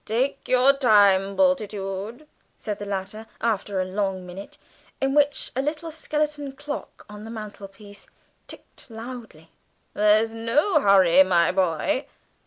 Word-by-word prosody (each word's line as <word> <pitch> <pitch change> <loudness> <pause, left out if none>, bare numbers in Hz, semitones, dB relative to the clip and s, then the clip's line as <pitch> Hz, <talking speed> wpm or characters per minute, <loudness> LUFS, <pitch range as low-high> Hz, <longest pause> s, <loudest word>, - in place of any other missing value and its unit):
"Take 250 +6 -2
your 255 +2 +4
time, 200 -7 +4
Bultitude," 215 -2 -1 0.3
said 210 -1 -5
the 205 - -6
latter, 200 +3 -5
after 205 -3 -1
a 185 - 0
long 190 -1 -3
minute, 185 +3 -10 0.4
in 270 0 0
which 290 -1 +1
a 265 - 0
little 305 +3 -4
skeleton 300 -2 -3
clock 290 +2 -8
on 210 0 -11
the 225 - -9
mantelpiece 205 -2 -10 0.4
ticked - - -12
loudly 225 -8 -10 0.4
"there's 215 +2 +3
no 260 - +1
hurry, 190 - +5
my 180 -3 +3
boy." 190 - 0
215 Hz, 130 wpm, -24 LUFS, 195-270 Hz, 0.4 s, hurry